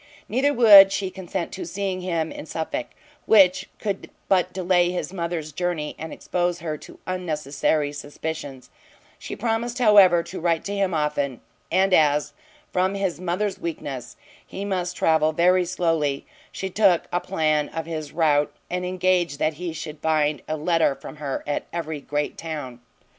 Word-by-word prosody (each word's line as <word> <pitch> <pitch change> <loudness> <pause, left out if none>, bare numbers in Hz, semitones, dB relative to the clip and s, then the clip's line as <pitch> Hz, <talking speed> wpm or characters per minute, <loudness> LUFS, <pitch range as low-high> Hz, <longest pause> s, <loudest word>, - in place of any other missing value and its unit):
Neither 265 +6 +2
would 205 -6 +9
she 195 -1 -2
consent 185 -1 -4
to 190 - -6
seeing 190 +1 -3
him 165 -3 -1
in - - -8
Suffolk; 165 - -3 0.4
which 185 -3 +5
could 200 -3 -4 0.2
but 185 -1 +2
delay 180 -1 +2
his 180 +1 -4
mother's 170 -4 -3
journey, 170 -2 -2
and 160 0 -6
expose 175 -1 -1
her 160 -3 -4
to - - -13
unnecessary 155 -4 -1
suspicions; 145 -2 -6 0.5
she - - -6
promised, 235 +2 -2
however, 200 -8 +6
to 175 +3 -7
write 165 -1 0
to 200 - -3
him 195 -3 0
often, 145 -4 -1 0.3
and 190 0 +3
as, 150 -3 +3 0.4
from 185 +2 +1
his 190 -3 -2
mother's 185 +3 -1
weakness, 140 -6 -6 0.3
he 195 - -7
must 180 -2 -2
travel 160 -1 +3
very 180 +2 +3
slowly, 165 -5 0 0.3
she 190 0 -5
took 190 -4 +4
a 175 - +2
plan 155 -5 0
of 165 0 -5
his 155 -3 -5
route, 150 -3 +2 0.2
and 180 0 -2
engaged 180 -4 +1
that 155 +2 +1
he 175 -2 -2
should 155 -1 -7
find 155 -2 +1
a 155 - -2
letter 165 -2 +2
from 135 +3 -10
her 145 -3 -4
at 145 - -3
every 160 -3 -4
great 145 +2 -3
town. 145 -7 -6
170 Hz, 160 wpm, -24 LUFS, 155-185 Hz, 0.5 s, would